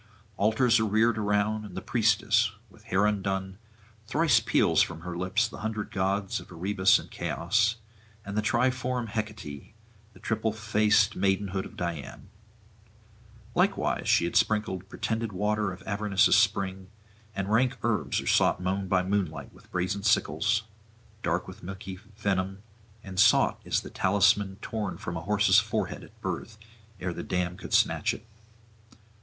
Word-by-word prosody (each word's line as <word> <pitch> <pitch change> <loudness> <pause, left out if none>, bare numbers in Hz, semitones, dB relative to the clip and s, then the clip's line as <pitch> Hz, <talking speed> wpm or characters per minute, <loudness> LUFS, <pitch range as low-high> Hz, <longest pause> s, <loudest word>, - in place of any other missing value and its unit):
Altars 110 +4 +3
are 110 - +1
reared 110 +2 +2
around, 105 +1 0
and 95 -3 -9
the - - 0
priestess, 110 -1 +2 0.2
with 110 +1 -20
hair 95 +3 +2
undone, 95 -2 -1 0.5
thrice 150 +3 +3
peals - - +3
from 80 - -1
her 90 0 -6
lips 95 +6 +1
the - - -10
hundred 110 -1 -4
gods 95 +1 -1
of - - -14
Erebus 95 +2 +3
and - - -10
Chaos, 110 +6 0 0.5
and 100 +1 -5
the 110 - +2
triform 125 +1 0
Hecate, 105 -8 -6 0.4
the 90 - -17
triple 110 +1 -1
faced 105 0 +2
maidenhood 95 0 0
of - - -17
Diana. 85 -5 -5 1.3
Likewise - - +1
she - - +4
had 85 - -4
sprinkled 100 -3 +1
pretended 115 -1 -2
waters 105 -1 -1
of 95 - -17
Avernus' 100 -2 +3
spring, 95 -2 +1 0.5
and 100 +1 -3
rank 125 +3 +2
herbs 115 -2 0
are - - -10
sought - - +3
mown 95 +1 -2
by 90 0 +2
moonlight 95 -5 -2
with - - -20
brazen 90 +3 -1
sickles, 105 +1 +2 0.6
dark 90 -2 -1
with 95 - -11
milky 95 +1 -7 0.2
venom, 95 -1 -1 0.4
and 95 -1 -6
sought 100 - +4
is - - 0
the - - -10
talisman 100 +1 +2
torn 105 -4 -3
from 85 - -5
a 80 - -4
horse's 100 +1 +4
forehead 105 0 -3
at - - -17
birth 110 -1 -4 0.4
ere 90 -1 -3
the - - -5
dam 90 -1 -2
could - - -10
snatch - - +2
it. 110 - -13
100 Hz, 150 wpm, -28 LUFS, 95-110 Hz, 1.3 s, she